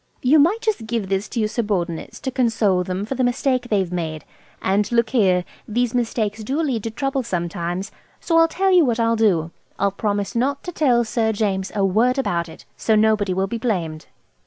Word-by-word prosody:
"You 285 Hz, +5 st, +5 dB
might 360 Hz, +10 st, +3 dB
just 420 Hz, -, -1 dB
give 225 Hz, -4 st, -2 dB
this 195 Hz, +1 st, -1 dB
to 240 Hz, -, -3 dB
your 215 Hz, -, +2 dB
subordinates 200 Hz, -7 st, -3 dB
to 265 Hz, -, -3 dB
console 225 Hz, -7 st, +2 dB
them 185 Hz, +2 st, -3 dB
for 230 Hz, -, -3 dB
the 260 Hz, -1 st, -1 dB
mistake 250 Hz, 0 st, 0 dB
they've 195 Hz, -4 st, +1 dB
made. 160 Hz, -3 st, -4 dB, 0.3 s
And 200 Hz, +3 st, 0 dB
look 235 Hz, -1 st, +2 dB
here, 185 Hz, -7 st, +3 dB, 0.2 s
these 240 Hz, +2 st, 0 dB
mistakes 225 Hz, -3 st, -1 dB
do 270 Hz, +8 st, -2 dB
lead 270 Hz, -8 st, 0 dB
to -, -, -1 dB
trouble 270 Hz, +4 st, -2 dB
sometimes. 175 Hz, -2 st, -3 dB, 0.3 s
So 330 Hz, -1 st, +2 dB
I'll 330 Hz, -, +6 dB
tell 380 Hz, +4 st, +1 dB
you 360 Hz, -2 st, +6 dB
what 240 Hz, -4 st, 0 dB
I'll 230 Hz, 0 st, +2 dB
do. 180 Hz, -8 st, +2 dB, 0.3 s
I'll 200 Hz, 0 st, +1 dB
promise 205 Hz, 0 st, -2 dB
not 270 Hz, +4 st, 0 dB
to 355 Hz, -, -5 dB
tell 255 Hz, -8 st, +2 dB
Sir 225 Hz, -1 st, 0 dB
James 195 Hz, -2 st, -1 dB
a 200 Hz, -1 st, +2 dB
word 230 Hz, +7 st, +2 dB
about 170 Hz, -10 st, -1 dB
it. -, -, -13 dB
So 220 Hz, -, +1 dB
nobody 215 Hz, -2 st, +2 dB
will. 190 Hz, +1 st, +1 dB
be 230 Hz, +4 st, -4 dB
blamed." 170 Hz, -9 st, -2 dB
220 Hz, 205 wpm, -21 LUFS, 190-250 Hz, 0.3 s, I'll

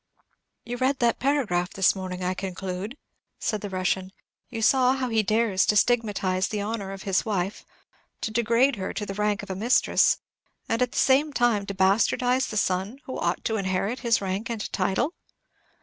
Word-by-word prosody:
"You 245 Hz, +1 st, -4 dB
read 260 Hz, +2 st, +1 dB
that 235 Hz, -2 st, +1 dB
paragraph 230 Hz, -11 st, 0 dB
this 195 Hz, 0 st, +3 dB
morning, 185 Hz, -1 st, -5 dB
I 180 Hz, +1 st, 0 dB
conclude?" 190 Hz, +5 st, -5 dB, 0.4 s
said 215 Hz, -3 st, -2 dB
the 205 Hz, -, -5 dB
Russian. 185 Hz, 0 st, -1 dB, 0.4 s
"You 230 Hz, -2 st, -5 dB
saw 255 Hz, +1 st, +4 dB
how 260 Hz, -2 st, -2 dB
he 225 Hz, -1 st, +2 dB
dares 215 Hz, -2 st, +2 dB
to 210 Hz, -, +3 dB
stigmatize 200 Hz, -5 st, +1 dB
the 210 Hz, -, -3 dB
honor 205 Hz, -1 st, -3 dB
of 195 Hz, -1 st, -8 dB
his 195 Hz, -2 st, +1 dB
wife, 200 Hz, -2 st, -2 dB, 0.6 s
to 220 Hz, -, -2 dB
degrade 235 Hz, +3 st, +2 dB
her 190 Hz, -, -4 dB
to 210 Hz, -, -3 dB
the 195 Hz, -, -5 dB
rank 210 Hz, +1 st, 0 dB
of 200 Hz, -, -6 dB
a -, -, -3 dB
mistress, 230 Hz, +6 st, +3 dB, 0.5 s
and, 230 Hz, +2 st, 0 dB
at 250 Hz, -1 st, +1 dB
the -, -, -5 dB
same 285 Hz, +3 st, +3 dB
time, 240 Hz, -5 st, +2 dB
to 200 Hz, -, -4 dB
bastardize 230 Hz, +7 st, +2 dB
the 215 Hz, -, -4 dB
son 190 Hz, +5 st, 0 dB
who 260 Hz, -, -5 dB
ought 170 Hz, +1 st, -1 dB
to 220 Hz, -, 0 dB
inherit 195 Hz, +4 st, -1 dB
his 235 Hz, -4 st, +2 dB
rank 195 Hz, +4 st, -3 dB
and 225 Hz, -3 st, -4 dB
title?" 195 Hz, -, 0 dB
210 Hz, 185 wpm, -26 LUFS, 190-240 Hz, 0.6 s, saw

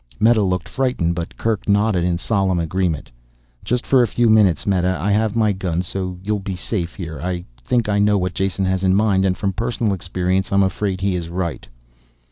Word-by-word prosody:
Meta 110 Hz, 0 st, +4 dB
looked 90 Hz, -2 st, -1 dB
frightened, 125 Hz, -11 st, 0 dB
but 85 Hz, 0 st, -6 dB
Kerk 110 Hz, -2 st, -2 dB
nodded 100 Hz, -3 st, +2 dB
in 90 Hz, -1 st, +1 dB
solemn 95 Hz, -1 st, 0 dB
agreement. 85 Hz, -4 st, -2 dB, 0.5 s
"Just 125 Hz, 0 st, -1 dB
for 130 Hz, -2 st, +4 dB
a 120 Hz, -, +3 dB
few 120 Hz, +2 st, +2 dB
minutes, 105 Hz, -6 st, +4 dB
Meta. 90 Hz, -2 st, +1 dB
I 100 Hz, -, 0 dB
have 110 Hz, +1 st, +1 dB
my 110 Hz, -2 st, +3 dB
gun 90 Hz, -3 st, -2 dB
so 90 Hz, 0 st, -4 dB
you 105 Hz, +2 st, -1 dB
will 105 Hz, -, -1 dB
be 95 Hz, -1 st, -5 dB
safe 90 Hz, -1 st, -3 dB
here. 80 Hz, -6 st, -6 dB
I 90 Hz, 0 st, -3 dB, 0.2 s
think 120 Hz, -, 0 dB
I 100 Hz, -1 st, +1 dB
know 105 Hz, 0 st, +3 dB
what 90 Hz, -2 st, -1 dB
Jason 95 Hz, +1 st, -1 dB
has 95 Hz, 0 st, 0 dB
in 95 Hz, 0 st, +3 dB
mind, 100 Hz, -2 st, +2 dB
and 90 Hz, -1 st, +1 dB
from 100 Hz, 0 st, -1 dB
personal 115 Hz, +1 st, -1 dB
experience 90 Hz, +1 st, -1 dB
I'm 100 Hz, 0 st, +4 dB
afraid 95 Hz, 0 st, -1 dB
he 100 Hz, -1 st, +1 dB
is 85 Hz, -2 st, -3 dB
right." 85 Hz, -5 st, -4 dB
95 Hz, 210 wpm, -20 LUFS, 90-105 Hz, 0.5 s, Meta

